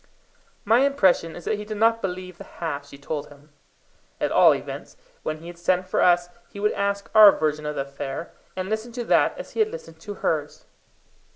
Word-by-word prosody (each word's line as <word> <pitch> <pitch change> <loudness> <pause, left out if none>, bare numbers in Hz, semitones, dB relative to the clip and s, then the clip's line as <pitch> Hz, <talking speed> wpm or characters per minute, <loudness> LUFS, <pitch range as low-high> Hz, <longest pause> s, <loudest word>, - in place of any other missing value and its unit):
My 225 +3 +5
impression 195 -12 +2
is 175 - -10
that 210 - -1
he - - -5
did 215 0 -6
not 225 +1 +3
believe 185 -1 -5
the - - -7
half 145 -4 -5
she 140 - -12
told 145 +1 -5
him. 145 +1 -18 0.7
At - - 0
all - - +6
events, - - -8 0.2
when 155 - -3
he 160 - -14
had 175 0 -10
sent 185 +1 +1
for - - 0
us, 175 -1 +4 0.2
he 200 - -10
would 210 +1 +2
ask 200 0 -2
our 215 -2 +10
version 150 -2 -1
of 150 - -3
the - - -1
affair, 140 +3 -6 0.2
and 185 0 -3
listen 220 +3 -3
to 245 0 -3
that - - +2
as - - -8
he - - -6
had 435 -1 +3
listened 430 - -10
to 205 +5 -7
hers. 150 -2 -2
180 Hz, 210 wpm, -24 LUFS, 155-215 Hz, 0.7 s, our